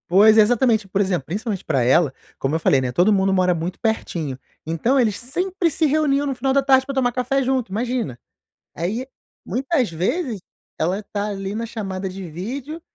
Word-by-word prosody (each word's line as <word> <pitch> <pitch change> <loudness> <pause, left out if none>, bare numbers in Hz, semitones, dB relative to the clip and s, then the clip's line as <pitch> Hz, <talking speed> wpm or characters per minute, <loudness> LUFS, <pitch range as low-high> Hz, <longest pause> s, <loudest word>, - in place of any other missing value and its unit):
Pois, 210 +5 +6
é - - +9
exatamente, 220 -1 +2
por 195 - -1
exemplo, 180 -8 0
principalmente 200 +2 -3
pra 135 -6 +1
ela, 135 +3 +3 0.2
como 135 +3 -1
eu - - +1
falei, 135 -4 +3
né, 125 -1 -2
todo 180 +11 +3
mundo 195 -1 +2
mora 185 -1 +3
muito 175 +3 -4
pertinho, 170 - -2 0.3
então 195 - +1
eles 220 -5 +2
sempre 355 +8 -1
se 315 +2 +1
reuniam 290 -1 +2
no 275 -2 -2
final 270 +1 0
da 275 - +4
tarde 265 -1 +4
pra 275 - -4
tomar 250 -2 +2
café 255 +2 0
junto, 260 -5 0
imagina. 230 - -2 0.6
Aí, 210 - -3 0.4
muitas 260 - 0
vezes, 220 - -2 0.4
ela 180 +6 0
tá 205 0 -4
ali 195 0 -4
na 230 +1 -2
chamada 195 -4 -4
de 185 -1 -7
vídeo, 260 - -6
215 Hz, 190 wpm, -22 LUFS, 180-260 Hz, 0.6 s, é